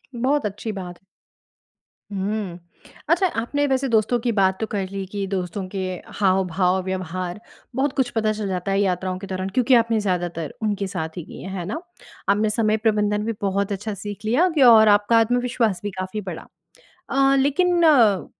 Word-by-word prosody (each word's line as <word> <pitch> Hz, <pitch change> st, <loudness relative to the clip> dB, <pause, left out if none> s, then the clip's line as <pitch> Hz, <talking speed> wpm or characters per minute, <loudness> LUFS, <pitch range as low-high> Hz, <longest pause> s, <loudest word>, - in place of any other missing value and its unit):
बहुत 265 Hz, +4 st, +1 dB
अच्छी 210 Hz, +2 st, -4 dB
बात। 180 Hz, -3 st, -7 dB, 1.1 s
हुँ, 195 Hz, -2 st, -3 dB, 0.5 s
अच्छा 360 Hz, +3 st, +4 dB
आपने 285 Hz, +5 st, 0 dB
वैसे 265 Hz, 0 st, +1 dB
दोस्तों 225 Hz, +1 st, +2 dB
की 240 Hz, +1 st, 0 dB
बात 190 Hz, -3 st, +2 dB
तो 220 Hz, -, -1 dB
कर 195 Hz, -3 st, -2 dB
ली 195 Hz, -1 st, -4 dB
कि 200 Hz, +1 st, -4 dB
दोस्तों 190 Hz, 0 st, -3 dB
के 195 Hz, -, -5 dB, 0.4 s
हाव-भाव 185 Hz, -1 st, +2 dB
व्यवहार 185 Hz, 0 st, -4 dB, 0.4 s
बहुत 270 Hz, +2 st, +1 dB
कुछ 260 Hz, -2 st, +2 dB
पता 220 Hz, -1 st, +1 dB
चल 210 Hz, -2 st, -4 dB
जाता 185 Hz, +1 st, -2 dB
है, 195 Hz, -, +2 dB
यात्राओं 185 Hz, -1 st, -1 dB
के 195 Hz, -, -8 dB
दौरान। 190 Hz, 0 st, -3 dB
क्योंकि 250 Hz, +5 st, +2 dB
आपने 230 Hz, -1 st, +3 dB
ज़्यादातर 175 Hz, -5 st, -2 dB
उनके 205 Hz, -2 st, -1 dB
साथ 160 Hz, -1 st, -5 dB
ही 175 Hz, -, -4 dB
की -, -, -10 dB
है, 190 Hz, -, -7 dB
है 175 Hz, -, -4 dB
ना? 220 Hz, -, -4 dB, 0.5 s
आपने 210 Hz, +2 st, +3 dB
समय 215 Hz, 0 st, +1 dB
प्रबंधन 210 Hz, -1 st, +1 dB
भी 230 Hz, -, -1 dB
बहुत 200 Hz, +1 st, 0 dB
अच्छा 205 Hz, +2 st, -3 dB
सीख 205 Hz, +2 st, -7 dB
लिया, 260 Hz, +12 st, +3 dB
कि 315 Hz, -4 st, 0 dB
और 225 Hz, -3 st, +8 dB
आपका 205 Hz, +2 st, +4 dB
आत्मविश्वास 235 Hz, -3 st, +1 dB
भी 205 Hz, -, -3 dB
काफ़ी 185 Hz, +3 st, -4 dB
बढ़ा। 185 Hz, -4 st, -7 dB, 0.6 s
अ, 275 Hz, 0 st, +4 dB
लेकिन 345 Hz, +6 st, +2 dB
अ, 230 Hz, -, +5 dB
205 Hz, 180 wpm, -22 LUFS, 190-230 Hz, 1.1 s, और